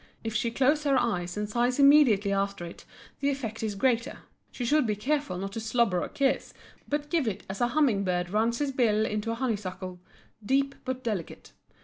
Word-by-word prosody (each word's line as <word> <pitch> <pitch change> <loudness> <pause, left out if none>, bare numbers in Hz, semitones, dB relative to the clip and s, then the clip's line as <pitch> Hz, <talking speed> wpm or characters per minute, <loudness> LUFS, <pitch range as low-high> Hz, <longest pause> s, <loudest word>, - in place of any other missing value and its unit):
If 225 -1 -3
she 235 +2 0
close 280 +5 +2
her 275 -2 +3
eyes 180 -6 -1
and 210 0 -2
sighs 240 +3 0
immediately 275 -9 +5
after 200 -2 -1
it 170 - -11 0.3
the 280 - +1
effect 235 -6 -4
is 215 -2 -2
greater. 240 +3 0 0.3
She 245 - -4
should 295 +1 +3
be 210 - 0
careful 285 -1 -1
not 195 +2 -4
to 225 - -5
slobber 220 -5 +1
a - - -4
kiss 275 -1 0 0.3
but 295 0 -2
give 325 -8 +1
it 205 - -3
as 190 +3 -6
a 240 - +4
humming 240 -7 +2
bird 180 -1 -1
runs 225 +3 +1
his 285 0 -1
bill 220 -5 +2
into 210 +1 -2
a 230 - -1
honeysuckle, 195 -7 -4 0.4
deep 275 +5 +1
but 260 0 -3
delicate. 205 -8 -4
230 Hz, 200 wpm, -28 LUFS, 200-270 Hz, 0.4 s, immediately